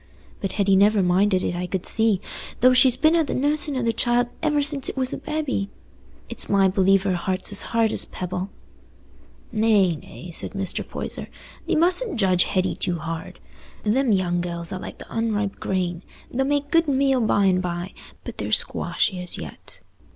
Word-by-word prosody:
But 195 Hz, -, -4 dB
Hetty 200 Hz, -2 st, +2 dB
never 200 Hz, +1 st, +4 dB
minded 185 Hz, +1 st, +2 dB
it, -, -, -1 dB
I 180 Hz, +1 st, -3 dB
could 185 Hz, -1 st, -3 dB
see, 220 Hz, -4 st, +3 dB, 0.4 s
though 255 Hz, +1 st, +6 dB
she's 255 Hz, -1 st, +6 dB
been 315 Hz, +1 st, +4 dB
at 325 Hz, -3 st, +2 dB
the -, -, -2 dB
nussin' 290 Hz, +1 st, +2 dB
o' 255 Hz, -, -1 dB
the 230 Hz, -1 st, +1 dB
child 240 Hz, +1 st, +1 dB
ever 300 Hz, -2 st, +1 dB
since 285 Hz, -2 st, +1 dB
it -, -, -7 dB
was 260 Hz, -1 st, 0 dB
a -, -, -3 dB
babby. 295 Hz, -10 st, -3 dB, 0.6 s
It's -, -, -1 dB
my 195 Hz, -1 st, +4 dB
belief 195 Hz, 0 st, +3 dB
her 195 Hz, -2 st, 0 dB
heart's 185 Hz, +3 st, -2 dB
as 205 Hz, -, +4 dB
hard 230 Hz, -1 st, +1 dB
as -, -, +3 dB
a -, -, -22 dB
pebble." 185 Hz, +1 st, -4 dB, 1.0 s
"Nay, 215 Hz, -6 st, +3 dB
nay," 170 Hz, +3 st, -11 dB
said -, -, -3 dB
Mr. 195 Hz, -2 st, -2 dB
Poyser, -, -, -6 dB, 0.4 s
"thee -, -, +1 dB
mustn't 355 Hz, -, +1 dB
judge 185 Hz, -3 st, +3 dB
Hetty 185 Hz, -1 st, 0 dB
too 175 Hz, -1 st, -1 dB
hard. 165 Hz, 0 st, -6 dB, 0.4 s
Them 245 Hz, +4 st, +2 dB
young 175 Hz, -3 st, +1 dB
gells 170 Hz, -1 st, -5 dB
are 185 Hz, -, -4 dB
like -, -, -8 dB
the -, -, -11 dB
unripe 215 Hz, -3 st, -1 dB
grain; 180 Hz, -2 st, -2 dB, 0.3 s
they'll 265 Hz, +2 st, 0 dB
make 285 Hz, 0 st, -1 dB
good 330 Hz, -1 st, +3 dB
meal 270 Hz, -2 st, +2 dB
by 205 Hz, -2 st, +2 dB
and 185 Hz, -1 st, +3 dB
by, 175 Hz, +1 st, -4 dB, 0.3 s
but -, -, -9 dB
they're -, -, -3 dB
squashy 185 Hz, -2 st, 0 dB
as 180 Hz, -, -7 dB
yet. 75 Hz, -2 st, -11 dB
205 Hz, 190 wpm, -23 LUFS, 185-260 Hz, 1.0 s, though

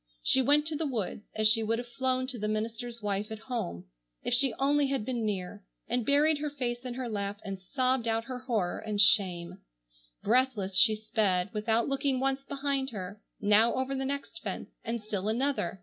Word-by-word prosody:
She 265 Hz, -, +5 dB
went 290 Hz, +3 st, +4 dB
to 315 Hz, 0 st, 0 dB
the 310 Hz, +1 st, -1 dB
woods 220 Hz, -5 st, -4 dB
as 215 Hz, 0 st, +4 dB
she 225 Hz, +1 st, +4 dB
would 225 Hz, +1 st, 0 dB
have 240 Hz, +1 st, -5 dB
flown 255 Hz, +2 st, 0 dB
to 255 Hz, -2 st, -4 dB
the 210 Hz, -, -1 dB
minister's 225 Hz, +2 st, -3 dB
wife 205 Hz, 0 st, -1 dB
at 220 Hz, -, -4 dB
home, 210 Hz, -, -4 dB, 0.4 s
if -, -, -1 dB
she 265 Hz, +1 st, +4 dB
only 285 Hz, +1 st, +3 dB
had 270 Hz, -5 st, -1 dB
been 240 Hz, -2 st, -2 dB
near, 200 Hz, 0 st, -4 dB, 0.2 s
and 245 Hz, +1 st, 0 dB
buried 290 Hz, +3 st, +3 dB
her 300 Hz, 0 st, -2 dB
face 250 Hz, -4 st, -3 dB
in 245 Hz, -1 st, -4 dB
her 255 Hz, -1 st, -3 dB
lap 205 Hz, -2 st, -3 dB
and 195 Hz, -1 st, -5 dB
sobbed 255 Hz, +4 st, 0 dB
out 225 Hz, 0 st, +1 dB
her 255 Hz, +1 st, -6 dB
horror 225 Hz, -8 st, -1 dB
and 210 Hz, -2 st, -3 dB
shame. 185 Hz, -3 st, +4 dB, 0.6 s
Breathless 225 Hz, -5 st, +1 dB
she 220 Hz, +2 st, +6 dB
sped, 205 Hz, -4 st, 0 dB
without 220 Hz, +2 st, +1 dB
looking 275 Hz, -1 st, 0 dB
once 270 Hz, +1 st, 0 dB
behind 275 Hz, -1 st, -2 dB
her, 200 Hz, -2 st, -7 dB, 0.2 s
now 210 Hz, +3 st, +4 dB
over 260 Hz, +1 st, -1 dB
the 270 Hz, 0 st, -2 dB
next 280 Hz, +5 st, -4 dB
fence -, -, -5 dB
and 230 Hz, -1 st, -3 dB
still 205 Hz, -2 st, -3 dB
another. 240 Hz, -3 st, 0 dB
235 Hz, 195 wpm, -30 LUFS, 210-265 Hz, 0.6 s, she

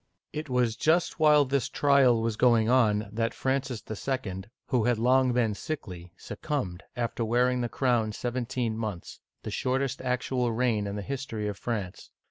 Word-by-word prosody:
It 155 Hz, -1 st, -5 dB
was 125 Hz, -3 st, +1 dB
just 160 Hz, +9 st, +1 dB
while 150 Hz, -2 st, +5 dB
his 135 Hz, -2 st, 0 dB
trial 135 Hz, -5 st, +4 dB
was 115 Hz, -1 st, -1 dB
going 115 Hz, -2 st, +4 dB
on 110 Hz, -4 st, +3 dB
that 115 Hz, +1 st, -1 dB
Francis 130 Hz, -3 st, -2 dB
II., 110 Hz, -4 st, -4 dB, 0.2 s
who 120 Hz, -4 st, +1 dB
had 120 Hz, -2 st, +2 dB
long 130 Hz, +2 st, +3 dB
been 120 Hz, -3 st, +1 dB
sickly, 90 Hz, -, -6 dB
succumbed, 105 Hz, -, -4 dB
after 120 Hz, -1 st, -2 dB
wearing 125 Hz, +2 st, +2 dB
the 120 Hz, -, -2 dB
crown 120 Hz, -5 st, +1 dB
seventeen 120 Hz, 0 st, -2 dB
months, 105 Hz, -6 st, -5 dB, 0.2 s
the -, -, -5 dB
shortest 130 Hz, +1 st, -1 dB
actual 125 Hz, -1 st, -1 dB
reign 115 Hz, -3 st, 0 dB
in 100 Hz, -, -4 dB
the 105 Hz, -, -4 dB
history 125 Hz, -5 st, -4 dB
of 105 Hz, -, -3 dB
France. 100 Hz, -4 st, -5 dB
120 Hz, 160 wpm, -28 LUFS, 110-130 Hz, 0.2 s, while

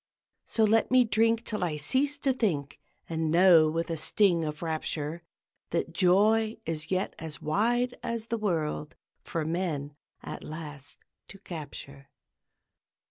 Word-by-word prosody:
So 225 Hz, -, +1 dB
let 220 Hz, +1 st, +3 dB
me 255 Hz, 0 st, +6 dB
drink 225 Hz, +1 st, +2 dB
till 210 Hz, -4 st, -2 dB
I 160 Hz, -4 st, -1 dB
cease 270 Hz, -, +1 dB
to 275 Hz, -2 st, +1 dB
think, 155 Hz, -, -1 dB, 0.3 s
And 160 Hz, -1 st, -1 dB
know 170 Hz, -2 st, +6 dB
with 165 Hz, +2 st, -2 dB
a 165 Hz, -, -2 dB
sting 170 Hz, +2 st, +2 dB
of 150 Hz, +1 st, -4 dB
rapture 160 Hz, 0 st, -3 dB, 0.5 s
That 165 Hz, 0 st, -2 dB
joy 215 Hz, +5 st, +3 dB
is 155 Hz, -1 st, -3 dB
yet 185 Hz, +1 st, -1 dB
as 160 Hz, -1 st, -6 dB
wide 240 Hz, +9 st, +1 dB
as 230 Hz, -1 st, -3 dB
the 230 Hz, -, 0 dB
world 160 Hz, -6 st, -2 dB, 0.3 s
For 160 Hz, -2 st, -3 dB
men, 160 Hz, -4 st, -2 dB, 0.3 s
at -, -, -7 dB
last, 150 Hz, -3 st, -8 dB, 0.3 s
to 195 Hz, -, -11 dB
capture! 145 Hz, -6 st, -9 dB
170 Hz, 140 wpm, -28 LUFS, 155-220 Hz, 0.5 s, me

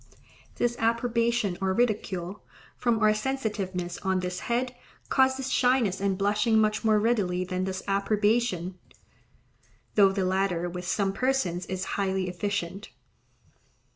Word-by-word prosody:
Disapprobation 235 Hz, -3 st, 0 dB
or 190 Hz, 0 st, +1 dB
ridicule, 200 Hz, -5 st, -1 dB, 0.3 s
from 235 Hz, -2 st, +1 dB
our 215 Hz, -1 st, +4 dB
sensitiveness 210 Hz, -7 st, -3 dB
on 190 Hz, -1 st, 0 dB
this 180 Hz, 0 st, -3 dB
head, 245 Hz, +1 st, -1 dB, 0.3 s
causes 265 Hz, 0 st, +2 dB
shyness 245 Hz, -7 st, +2 dB
and 195 Hz, -1 st, +1 dB
blushing 210 Hz, +3 st, +2 dB
much 215 Hz, 0 st, +2 dB
more 215 Hz, -1 st, +4 dB
readily 205 Hz, -5 st, +1 dB
than 185 Hz, 0 st, -2 dB
does 190 Hz, 0 st, -4 dB
approbation; 200 Hz, -2 st, +1 dB, 1.1 s
though 200 Hz, -2 st, +6 dB
the 195 Hz, -1 st, -1 dB
latter 185 Hz, -2 st, 0 dB
with 180 Hz, 0 st, -6 dB
some 195 Hz, +1 st, 0 dB
persons 195 Hz, -9 st, 0 dB
is 185 Hz, -1 st, -3 dB, 0.2 s
highly 190 Hz, -1 st, 0 dB
efficient. 195 Hz, +1 st, -3 dB
200 Hz, 120 wpm, -27 LUFS, 185-230 Hz, 1.1 s, though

